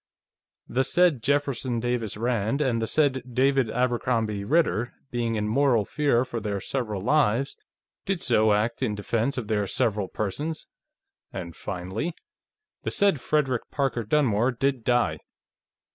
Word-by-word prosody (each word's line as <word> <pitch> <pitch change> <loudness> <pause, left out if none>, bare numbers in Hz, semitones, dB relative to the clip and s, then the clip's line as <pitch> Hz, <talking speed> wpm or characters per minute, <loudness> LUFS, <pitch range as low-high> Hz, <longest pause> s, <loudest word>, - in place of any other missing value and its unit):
the 130 +3 +1
said 165 -1 +3
Jefferson 140 -3 0
Davis 120 -3 -2
Rand 115 +2 0
and 125 -6 +1
the 110 - -1
said 140 -2 +2
David 135 -1 +3
Abercrombie 115 -4 0
Ritter, 125 -3 +1 0.2
being 115 -2 -1
in 105 -1 -1
mortal 120 -2 +3
fear 140 -3 +1
for 120 - -4
their 105 -2 -3
several 110 -2 -3
lives, 135 +1 +2 0.5
did 195 -2 -1
so 110 - +3
act 110 +4 +1
in 110 -5 0
defense 115 +6 -1
of 120 -4 -3
their 105 -2 0
several 105 0 0
persons..." 145 - -3 0.7
and, 85 -3 -6
finally, 95 - -4 0.3
"... 430 0 -60
the - - -1
said 200 -9 +2
Frederick 135 -6 0
Parker 135 -5 -1
Dunmore 120 -1 +2
did 130 0 -1
die." 120 0 +1
120 Hz, 145 wpm, -26 LUFS, 110-140 Hz, 0.7 s, said